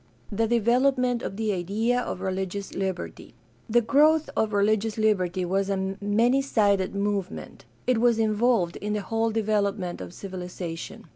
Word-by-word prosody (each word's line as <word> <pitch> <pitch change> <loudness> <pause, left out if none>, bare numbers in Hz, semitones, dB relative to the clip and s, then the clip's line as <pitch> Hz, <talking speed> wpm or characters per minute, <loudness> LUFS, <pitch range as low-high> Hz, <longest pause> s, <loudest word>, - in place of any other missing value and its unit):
The 225 +2 +1
development 245 +2 +2
of 195 - -5
the 220 -2 0
idea 215 +7 0
of 185 - -5
religious 190 +1 -3
liberty. 185 - -5 0.2
— 120 +1 -34
The 240 +2 +4
growth 300 +6 +3
of 220 -1 +1
religious 215 +1 +1
liberty 190 -4 +1
was 195 +2 0
a 195 - 0 0.2
many 230 +6 +3
sided 200 -8 +1
movement. 200 -1 -3 0.2
It 250 -3 +2
was 235 -1 +3
involved 220 -4 +1
in 210 +1 -3
the 210 - -1
whole 225 +2 0
development 205 -4 -1
of - - -7
civilization. 180 -3 -7
210 Hz, 150 wpm, -26 LUFS, 190-230 Hz, 0.2 s, The